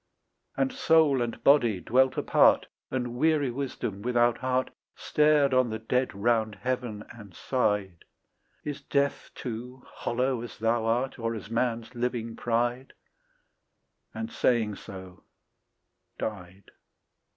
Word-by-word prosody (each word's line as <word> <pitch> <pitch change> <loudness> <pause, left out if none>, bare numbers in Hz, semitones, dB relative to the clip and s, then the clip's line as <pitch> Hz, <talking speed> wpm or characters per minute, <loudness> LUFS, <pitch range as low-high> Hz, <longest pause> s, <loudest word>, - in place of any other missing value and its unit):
And 270 -1 +1
soul 160 - +4
and 120 -1 -4
body 120 -9 +4
dwelt 130 +6 +2
apart; - - +4 0.2
And 125 -2 -3
weary 150 -2 +2
wisdom 120 -6 -4
without 120 0 +2
heart 130 0 0 0.2
Stared 150 -2 +3
on 130 -2 +3
the 110 - -3
dead 125 +3 -1
round 110 +1 +1
heaven 125 -3 -3
and 105 -6 -13
sighed, 105 -8 -1 0.6
"Is 145 -2 -5
death 140 0 -1
too 125 +1 -7
hollow 125 0 -2
as 120 - -8
thou 115 +1 +1
art, 125 +3 0
Or 115 0 -2
as 105 0 -8
man's 115 0 -1
living 120 -2 -2
pride?" 120 +2 -1 1.2
And 225 +1 -5
saying 115 - +1
so 95 -2 -10 1.0
died. 95 -2 -6
120 Hz, 120 wpm, -28 LUFS, 110-130 Hz, 1.2 s, soul